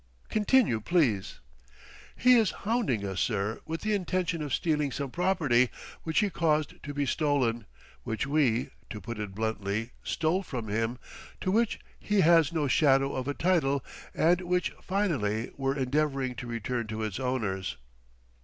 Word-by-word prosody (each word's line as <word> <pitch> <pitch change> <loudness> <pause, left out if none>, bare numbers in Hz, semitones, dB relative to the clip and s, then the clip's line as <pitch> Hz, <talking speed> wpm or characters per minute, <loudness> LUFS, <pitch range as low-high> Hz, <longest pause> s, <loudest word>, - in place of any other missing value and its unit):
Continue, 215 - +3
please." 115 - +1 0.7
"He 250 0 +5
is 225 -5 +5 0.2
hounding 205 - +1
us, 95 -1 -3
sir, 105 -1 -1
with 165 +1 -3
the 215 0 0
intention 180 -3 -1
of 145 -2 -4
stealing 150 +2 +1
some 140 0 -4
property, 150 -10 +2 0.3
which 160 +6 +1
he 205 -2 0
caused 155 -3 0
to 145 - -6
be 145 0 -1
stolen, 130 - 0 0.3
which 110 +2 -2
we 135 -5 +1 0.2
to 105 - -6
put 115 0 -6
it 105 -3 -5
bluntly 110 +1 -2
stole 170 +4 0
from 120 - -5
him, 115 +3 -1 0.4
to 185 - 0
which 225 +2 +2 0.2
he 210 -2 +2
has 165 -2 +5
no 155 -4 0
shadow 135 +1 +3
of 130 0 -3
a 145 - -1
title, 145 -7 +1 0.3
and 175 +3 +3
which, 180 0 0
finally, 135 - -1
we're 135 +1 -1
endeavoring 135 -1 0
to 125 - -7
return 115 0 -3
to 110 +1 -4
its 110 +1 -3
owners." 100 - -2
140 Hz, 155 wpm, -29 LUFS, 115-170 Hz, 0.7 s, He